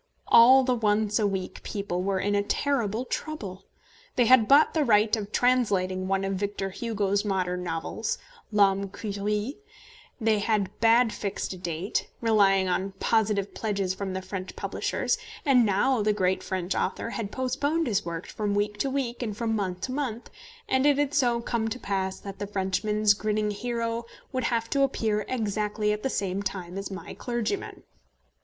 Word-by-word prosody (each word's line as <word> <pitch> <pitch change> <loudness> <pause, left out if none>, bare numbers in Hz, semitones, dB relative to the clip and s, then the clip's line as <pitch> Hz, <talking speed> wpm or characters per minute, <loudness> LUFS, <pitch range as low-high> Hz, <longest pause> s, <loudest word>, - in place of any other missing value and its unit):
All 260 +3 +7
the 255 0 +2
Once 215 -2 +1
a 210 - +3
Week 190 -2 -4
people 200 -3 -3
were 195 0 0
in 205 +2 0
a 205 - +3
terrible 230 +1 0
trouble. 200 -12 -5 0.5
They 245 - +4
had 230 -2 +6
bought 285 +3 +6
the 315 - +2
right 215 -2 +4
of 210 -2 -5
translating 195 -8 +1
one 195 0 +1
of 195 0 -1
Victor 200 -1 -3
Hugo's 205 -2 -1
modern 185 -3 -1
novels, 170 +6 -3 0.3
L'Homme 200 -1 +3
Qui 210 +2 -6
Rit; 210 +6 -1 0.6
they 220 -2 +2
had 205 -2 0 0.4
fixed 200 -1 -3
a - - -8
date, 175 +2 -2
relying 200 -4 +3
on 190 +2 -1
positive 205 -1 +1
pledges 200 -4 -1
from 190 0 -4
the 190 0 -4
French 185 0 -6
publishers; - - -1 0.3
and 250 -5 +5
now 220 +5 +2
the 210 0 +2
great 190 -2 +1
French 185 -1 -2
author 230 - -2
had 220 -4 -4
postponed 285 +5 0
his 210 -4 0
work 170 0 -5
from 205 -2 -2
week 205 0 -1
to 275 - +1
week 260 -3 -2
and 215 -4 -3
from 225 -1 0
month 185 -3 -2
to 255 - -3
month, 255 -4 -4 0.4
and 265 +2 +3
it 290 -1 +4
had 290 0 0
so 245 -5 +2
come 230 -1 -1
to 225 +3 -3
pass 190 -4 -2
that 195 -1 -9
the 205 - -3
Frenchman's 205 +2 +1
grinning 210 0 -1
hero 230 +2 -3 0.3
would 255 -2 -1
have 230 -1 0
to 280 - +2
appear 220 -6 +1
exactly 210 -2 0
at 210 - -4
the 270 - -1
same 195 -4 -1
time 185 -3 -5
as 195 0 -4
my 190 -1 -7
clergyman. 240 - -3
210 Hz, 175 wpm, -27 LUFS, 195-235 Hz, 0.6 s, All